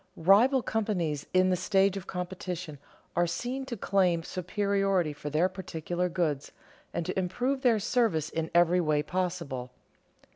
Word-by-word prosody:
Rival 225 Hz, +10 st, +5 dB
companies 180 Hz, -11 st, -1 dB
in 185 Hz, 0 st, +4 dB
the -, -, +3 dB
stage 195 Hz, +1 st, +2 dB
of 195 Hz, -1 st, -6 dB
competition 180 Hz, -4 st, -5 dB, 0.4 s
are 175 Hz, 0 st, +3 dB
seen 255 Hz, +9 st, -3 dB
to 235 Hz, -, -4 dB
claim 185 Hz, -4 st, +2 dB
superiority 195 Hz, -2 st, 0 dB
for 145 Hz, 0 st, -6 dB
their 155 Hz, +5 st, +2 dB
particular 180 Hz, -1 st, -3 dB
goods 160 Hz, -5 st, -1 dB, 0.4 s
and 170 Hz, -, -3 dB
to 185 Hz, +2 st, -1 dB
improve 250 Hz, +9 st, -1 dB
their 240 Hz, -4 st, +4 dB
service 210 Hz, -, +1 dB
in 160 Hz, 0 st, -2 dB
every 175 Hz, +1 st, +5 dB
way 150 Hz, -2 st, +1 dB
possible. 170 Hz, -9 st, -3 dB
180 Hz, 145 wpm, -29 LUFS, 165-200 Hz, 0.4 s, Rival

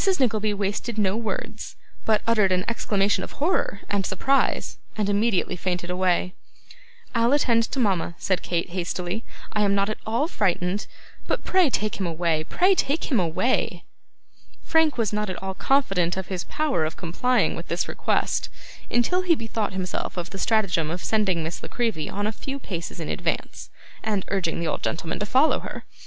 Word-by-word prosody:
Nickleby 215 Hz, -5 st, +2 dB
wasted 205 Hz, +3 st, -2 dB
no 200 Hz, -2 st, +2 dB
words, 225 Hz, -1 st, -4 dB, 0.3 s
but 215 Hz, -1 st, +3 dB
uttered 215 Hz, -4 st, +3 dB
an 185 Hz, 0 st, +1 dB
exclamation 205 Hz, -3 st, +1 dB
of -, -, -7 dB
horror 295 Hz, -, 0 dB
and 200 Hz, -1 st, 0 dB
surprise, 270 Hz, +10 st, +1 dB, 0.2 s
and 210 Hz, -2 st, +1 dB
immediately 205 Hz, -2 st, +2 dB
fainted 180 Hz, 0 st, -2 dB
away. 180 Hz, 0 st, +1 dB, 0.8 s
'I'll 235 Hz, +2 st, +3 dB
attend 235 Hz, -5 st, +3 dB
to 270 Hz, -, -3 dB
mama,' 190 Hz, -7 st, +1 dB
said 185 Hz, -3 st, 0 dB
Kate, 170 Hz, 0 st, -1 dB
hastily; 180 Hz, +3 st, -3 dB, 0.3 s
'I 210 Hz, -, +1 dB
am 200 Hz, -1 st, +3 dB
not 200 Hz, +1 st, +2 dB
at -, -, -5 dB
all 230 Hz, +8 st, +1 dB
frightened. 190 Hz, -, 0 dB, 0.4 s
But -, -, -1 dB
pray 370 Hz, -5 st, +4 dB
take 215 Hz, -4 st, -1 dB
him 190 Hz, -, 0 dB
away: 165 Hz, -1 st, 0 dB
pray 370 Hz, -, +4 dB
take 310 Hz, -3 st, 0 dB
him 245 Hz, -, +4 dB
away!' 180 Hz, +9 st, 0 dB, 0.8 s
Frank 320 Hz, -3 st, +3 dB
was 220 Hz, -3 st, 0 dB
not 210 Hz, -1 st, 0 dB
at 185 Hz, -, -4 dB
all 190 Hz, 0 st, -2 dB
confident 190 Hz, -9 st, +2 dB
of 190 Hz, -, -4 dB
his 185 Hz, -2 st, -3 dB
power 300 Hz, -, 0 dB
of 155 Hz, 0 st, -3 dB
complying 240 Hz, +8 st, +1 dB
with -, -, -7 dB
this -, -, -1 dB
request, -, -, 0 dB, 0.4 s
until 300 Hz, +10 st, +2 dB
he 355 Hz, -2 st, +4 dB
bethought 225 Hz, -5 st, -2 dB
himself 185 Hz, 0 st, -3 dB
of 175 Hz, 0 st, -4 dB
the 195 Hz, -, -6 dB
stratagem 195 Hz, -9 st, +2 dB
of 175 Hz, +3 st, -4 dB
sending 195 Hz, -6 st, +1 dB
Miss 160 Hz, +1 st, -4 dB
La -, -, -7 dB
Creevy 225 Hz, -10 st, -1 dB
on 205 Hz, +1 st, -2 dB
a 215 Hz, -, +1 dB
few 270 Hz, +5 st, -5 dB
paces 175 Hz, -11 st, -5 dB
in 160 Hz, -, -4 dB
advance, -, -, -3 dB, 0.3 s
and 210 Hz, -3 st, -1 dB
urging 185 Hz, -4 st, 0 dB
the 170 Hz, -, -1 dB
old 150 Hz, -, -1 dB
gentleman 165 Hz, 0 st, -2 dB
to 210 Hz, -, -2 dB
follow 265 Hz, +8 st, +4 dB
her. -, -, -7 dB
205 Hz, 180 wpm, -25 LUFS, 180-230 Hz, 0.8 s, pray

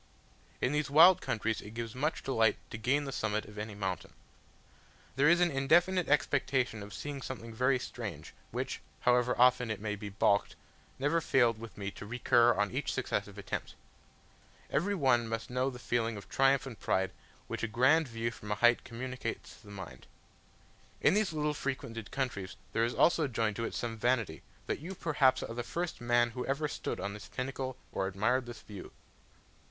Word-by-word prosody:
In 125 Hz, -, +2 dB
these 150 Hz, 0 st, 0 dB
wild 165 Hz, +5 st, +8 dB
countries 110 Hz, 0 st, -1 dB
it 105 Hz, +2 st, -11 dB
gives 115 Hz, -1 st, -4 dB
much 150 Hz, +5 st, -1 dB
delight 115 Hz, -5 st, +2 dB
to 115 Hz, -, -5 dB
gain 135 Hz, +6 st, +2 dB
the 135 Hz, -, -4 dB
summit 110 Hz, -4 st, -1 dB
of 105 Hz, 0 st, -10 dB
any 105 Hz, 0 st, -5 dB
mountain. 95 Hz, -2 st, -4 dB, 1.0 s
There 140 Hz, +3 st, +5 dB
is 170 Hz, 0 st, +5 dB
an 175 Hz, -1 st, +4 dB
indefinite 170 Hz, +7 st, +3 dB
expectation 130 Hz, -5 st, +1 dB
of 100 Hz, 0 st, -9 dB
seeing 145 Hz, +2 st, -5 dB
something 115 Hz, -3 st, -6 dB
very 130 Hz, +3 st, +3 dB
strange, 125 Hz, -, -6 dB, 0.2 s
which, -, -, -4 dB, 0.2 s
however 125 Hz, 0 st, +3 dB
often 125 Hz, -1 st, +5 dB
it 110 Hz, -, -2 dB
may 105 Hz, 0 st, -2 dB
be 105 Hz, 0 st, -7 dB
balked, 100 Hz, +1 st, +2 dB, 0.4 s
never 145 Hz, +5 st, +1 dB
failed 120 Hz, -7 st, +3 dB
with 115 Hz, 0 st, -10 dB
me 100 Hz, -1 st, -4 dB
to 105 Hz, -, -9 dB
recur 120 Hz, +1 st, +4 dB
on 105 Hz, -2 st, +1 dB
each -, -, -2 dB
successive -, -, -2 dB
attempt. -, -, -5 dB, 1.0 s
Every 200 Hz, +7 st, +1 dB
one 125 Hz, -8 st, +3 dB
must 115 Hz, +1 st, -4 dB
know 130 Hz, +2 st, +1 dB
the 125 Hz, -, -8 dB
feeling 115 Hz, -2 st, -1 dB
of 100 Hz, -, -10 dB
triumph 135 Hz, +1 st, +3 dB
and 125 Hz, -5 st, -8 dB
pride 95 Hz, 0 st, 0 dB, 0.3 s
which -, -, -5 dB
a 115 Hz, -, 0 dB
grand 130 Hz, +8 st, +4 dB
view 115 Hz, 0 st, -2 dB
from 105 Hz, -2 st, -8 dB
a -, -, +2 dB
height 120 Hz, +2 st, +4 dB
communicates 130 Hz, +2 st, -6 dB
to -, -, -19 dB
the -, -, -10 dB
mind. 95 Hz, -11 st, -9 dB, 0.9 s
In -, -, +4 dB
these 210 Hz, -2 st, +2 dB
little 150 Hz, -1 st, 0 dB
frequented 120 Hz, -6 st, -4 dB
countries 110 Hz, -9 st, -3 dB, 0.2 s
there 115 Hz, -, +2 dB
is 120 Hz, -, -3 dB
also 165 Hz, -3 st, +4 dB
joined 110 Hz, -4 st, -1 dB
to 115 Hz, -, -1 dB
it -, -, -4 dB
some 115 Hz, -1 st, -3 dB
vanity, 115 Hz, -9 st, 0 dB, 0.2 s
that -, -, -2 dB
you 180 Hz, +6 st, -7 dB
perhaps 140 Hz, -6 st, +2 dB
are -, -, -5 dB
the 120 Hz, -, -3 dB
first 170 Hz, +5 st, -4 dB
man 120 Hz, 0 st, +3 dB
who 125 Hz, +2 st, -4 dB
ever 140 Hz, +3 st, 0 dB
stood -, -, -4 dB
on 100 Hz, -, -3 dB
this 105 Hz, -, -10 dB
pinnacle 130 Hz, 0 st, -4 dB
or 95 Hz, -, -1 dB
admired 120 Hz, +6 st, +1 dB
this 120 Hz, -, -8 dB
view. 100 Hz, -3 st, -10 dB
120 Hz, 190 wpm, -32 LUFS, 110-135 Hz, 1.0 s, wild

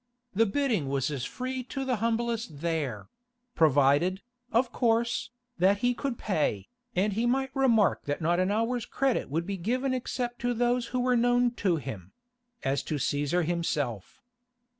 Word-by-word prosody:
The 225 Hz, +3 st, +3 dB
bidding 215 Hz, -, 0 dB
was 135 Hz, +1 st, 0 dB
as 135 Hz, -4 st, -3 dB
free 255 Hz, -, -4 dB
to 270 Hz, +1 st, -4 dB
the 255 Hz, -3 st, 0 dB
humblest 230 Hz, -6 st, -1 dB
there—provided, 170 Hz, -, 0 dB, 0.3 s
of 235 Hz, +1 st, +2 dB
course, 235 Hz, -1 st, +1 dB, 0.3 s
that 195 Hz, +3 st, +4 dB
he 245 Hz, -, +3 dB
could 255 Hz, -1 st, -3 dB
pay, 150 Hz, -, -1 dB, 0.3 s
and 200 Hz, +3 st, +2 dB
he 230 Hz, +4 st, 0 dB
might 265 Hz, +2 st, 0 dB
remark 235 Hz, -7 st, +3 dB
that 145 Hz, 0 st, -2 dB
not 170 Hz, +2 st, +1 dB
an 185 Hz, +1 st, +2 dB
hour's 230 Hz, +3 st, 0 dB
credit 270 Hz, -, 0 dB
would 165 Hz, +4 st, -1 dB
be 200 Hz, +1 st, -3 dB
given 255 Hz, +8 st, 0 dB
except 245 Hz, -1 st, -3 dB
to 245 Hz, 0 st, 0 dB
those 240 Hz, +1 st, +1 dB
who 250 Hz, +1 st, -1 dB
were 250 Hz, 0 st, +2 dB
known 245 Hz, 0 st, +3 dB
to 185 Hz, -4 st, +3 dB
him—as 165 Hz, -, -6 dB
to 155 Hz, -, -3 dB
Cæsar 145 Hz, +4 st, 0 dB
himself. 150 Hz, -, -2 dB
225 Hz, 155 wpm, -28 LUFS, 160-245 Hz, 0.3 s, that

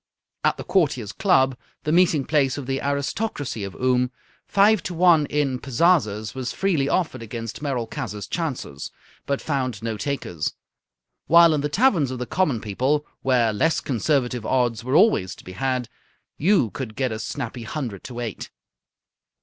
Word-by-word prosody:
At -, -, +2 dB
the -, -, -6 dB
Courtiers' 140 Hz, -, +1 dB
Club, 135 Hz, -10 st, +3 dB, 0.3 s
the 150 Hz, -, -1 dB
meeting 165 Hz, -5 st, +3 dB
place 140 Hz, -4 st, +1 dB
of 140 Hz, -, -5 dB
the 135 Hz, +1 st, -2 dB
aristocracy 140 Hz, -, -2 dB
of 100 Hz, -, -6 dB
Oom, 125 Hz, 0 st, +2 dB, 0.4 s
five 205 Hz, 0 st, +4 dB
to 180 Hz, -, -5 dB
one 165 Hz, -4 st, +5 dB
in 140 Hz, -4 st, 0 dB
pazazas 125 Hz, -, +1 dB
was 130 Hz, -2 st, -4 dB
freely 165 Hz, -8 st, +1 dB
offered 155 Hz, -7 st, 0 dB
against 115 Hz, +1 st, -6 dB
Merolchazzar's 120 Hz, -6 st, -3 dB
chances, 130 Hz, -, -4 dB, 0.4 s
but 140 Hz, -1 st, -1 dB
found 130 Hz, -7 st, -2 dB
no 115 Hz, -2 st, -2 dB
takers; 105 Hz, -, -3 dB, 0.7 s
while 170 Hz, 0 st, +7 dB
in 150 Hz, -, 0 dB
the 150 Hz, -, -1 dB
taverns 180 Hz, -, +3 dB
of 130 Hz, -, -4 dB
the 125 Hz, -, -3 dB
common 140 Hz, -2 st, 0 dB
people, 130 Hz, +8 st, 0 dB, 0.2 s
where 120 Hz, -4 st, +2 dB
less 160 Hz, +10 st, +2 dB
conservative 125 Hz, -2 st, 0 dB
odds 120 Hz, -3 st, 0 dB
were 130 Hz, +3 st, -1 dB
always 165 Hz, -, +4 dB
to -, -, -15 dB
be 95 Hz, -, -9 dB
had, 125 Hz, +5 st, -1 dB, 0.5 s
you 165 Hz, -, +2 dB
could 115 Hz, -5 st, -6 dB
get 130 Hz, -3 st, -1 dB
a 110 Hz, -, -4 dB
snappy 120 Hz, +2 st, -5 dB
hundred 115 Hz, -, -5 dB
to 120 Hz, -1 st, -6 dB
eight. 115 Hz, -4 st, -5 dB
130 Hz, 160 wpm, -23 LUFS, 115-155 Hz, 0.7 s, while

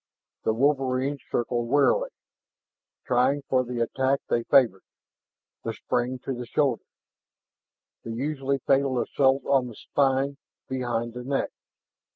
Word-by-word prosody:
The 110 Hz, -, +3 dB
wolverines 135 Hz, +1 st, +1 dB
circled 120 Hz, 0 st, -1 dB
warily, 325 Hz, -, +3 dB, 1.0 s
trying 130 Hz, +3 st, +2 dB
for 130 Hz, -1 st, +1 dB
the 120 Hz, -1 st, -4 dB
attack 130 Hz, +4 st, +1 dB
they 120 Hz, -, +1 dB
favored 115 Hz, -6 st, +4 dB, 0.8 s
the -, -, -3 dB
spring 125 Hz, +1 st, -1 dB
to 135 Hz, -, -2 dB
the 120 Hz, -1 st, -6 dB
shoulders, 135 Hz, -4 st, 0 dB, 1.2 s
the -, -, -7 dB
usually 135 Hz, +3 st, -1 dB
fatal 135 Hz, -2 st, +2 dB
assault 135 Hz, +1 st, +2 dB
on 135 Hz, -3 st, +2 dB
the 120 Hz, -, -9 dB
spine 135 Hz, +2 st, 0 dB, 0.3 s
behind 120 Hz, -3 st, -2 dB
the 125 Hz, 0 st, -6 dB
neck. 135 Hz, +2 st, -1 dB
130 Hz, 125 wpm, -26 LUFS, 120-140 Hz, 1.2 s, favored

